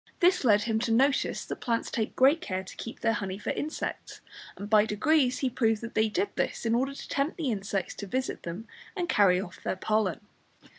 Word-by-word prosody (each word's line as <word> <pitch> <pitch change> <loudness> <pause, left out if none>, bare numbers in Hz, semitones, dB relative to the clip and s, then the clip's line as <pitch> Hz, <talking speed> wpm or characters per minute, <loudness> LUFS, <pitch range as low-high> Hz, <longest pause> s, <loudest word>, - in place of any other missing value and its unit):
This 360 -1 +4
led 210 -4 +4
him 225 -1 0
to 230 0 -1
notice 265 +4 +2
that - - -5
plants 230 -1 -1
take 220 -2 -2
great 275 +5 +5
care 185 0 -3
to 185 - -11
keep 230 - -8
their 225 - +2
honey 195 -3 -3
for 210 - -3
insects, 305 +2 -4 0.4
and 200 - -6
by 210 0 +5
degrees 255 +5 +2
he - - +2
proved 225 -3 +1
that 230 0 -7
they 220 0 +2
did 390 - 0
this - - -2
in 225 - +2
order 265 +4 0
to - - -9
tempt 280 +3 -1
the 300 -7 -1
insects 195 -2 -2
to 200 - -6
visit 260 +6 -2
them 175 +7 -6 0.3
and 355 -3 -2
carry 190 - +4
off 185 -1 -8
their - - -2
pollen. 215 +1 0
225 Hz, 215 wpm, -28 LUFS, 205-265 Hz, 0.4 s, great